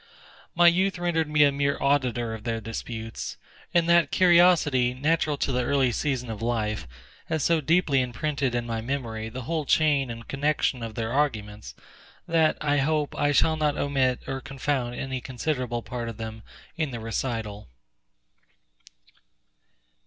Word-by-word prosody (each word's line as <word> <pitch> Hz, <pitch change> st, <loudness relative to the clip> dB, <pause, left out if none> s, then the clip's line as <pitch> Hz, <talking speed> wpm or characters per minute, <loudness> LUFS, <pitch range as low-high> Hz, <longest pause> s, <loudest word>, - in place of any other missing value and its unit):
My 175 Hz, +1 st, +5 dB
youth 185 Hz, +2 st, +4 dB
rendered 165 Hz, -3 st, 0 dB
me 150 Hz, -1 st, +5 dB
a 145 Hz, -, +5 dB
mere 140 Hz, 0 st, 0 dB
auditor 125 Hz, -5 st, +1 dB
of 110 Hz, -1 st, -8 dB
their 115 Hz, -1 st, -2 dB
disputes; 115 Hz, 0 st, -6 dB, 0.3 s
and 170 Hz, -1 st, +2 dB
that 170 Hz, 0 st, +4 dB
curiosity, 170 Hz, -8 st, +4 dB
natural 150 Hz, +2 st, +1 dB
to 140 Hz, -, -1 dB
the 125 Hz, -1 st, 0 dB
early 130 Hz, 0 st, +2 dB
season 130 Hz, -2 st, -2 dB
of 110 Hz, -, -7 dB
life, 110 Hz, -, -1 dB, 0.4 s
has 160 Hz, -3 st, -1 dB
so 165 Hz, -2 st, +3 dB
deeply 150 Hz, -3 st, +3 dB
imprinted 135 Hz, 0 st, -2 dB
in 120 Hz, -1 st, -1 dB
my 115 Hz, -1 st, -3 dB
memory 115 Hz, -3 st, -4 dB
the 125 Hz, +2 st, -7 dB
whole 160 Hz, +4 st, -2 dB
chain 145 Hz, -3 st, +2 dB
and 115 Hz, -1 st, -8 dB
connection 140 Hz, -2 st, 0 dB
of 115 Hz, -1 st, -6 dB
their 115 Hz, 0 st, -3 dB
arguments, 110 Hz, -8 st, -2 dB, 0.5 s
that, 160 Hz, -2 st, +3 dB
I 145 Hz, -1 st, +1 dB
hope, 150 Hz, +1 st, 0 dB
I 145 Hz, -, +1 dB
shall 160 Hz, +3 st, +3 dB
not 150 Hz, -2 st, 0 dB
omit 130 Hz, -3 st, +1 dB
or 135 Hz, 0 st, -4 dB
confound 135 Hz, -2 st, -2 dB
any 130 Hz, -1 st, -4 dB
considerable 125 Hz, -2 st, -3 dB
part 120 Hz, -2 st, -5 dB
of 115 Hz, -, -8 dB
them 110 Hz, 0 st, -6 dB, 0.3 s
in 155 Hz, -3 st, -1 dB
the 120 Hz, -3 st, -6 dB
recital. 115 Hz, -2 st, -4 dB
135 Hz, 155 wpm, -26 LUFS, 115-150 Hz, 0.5 s, My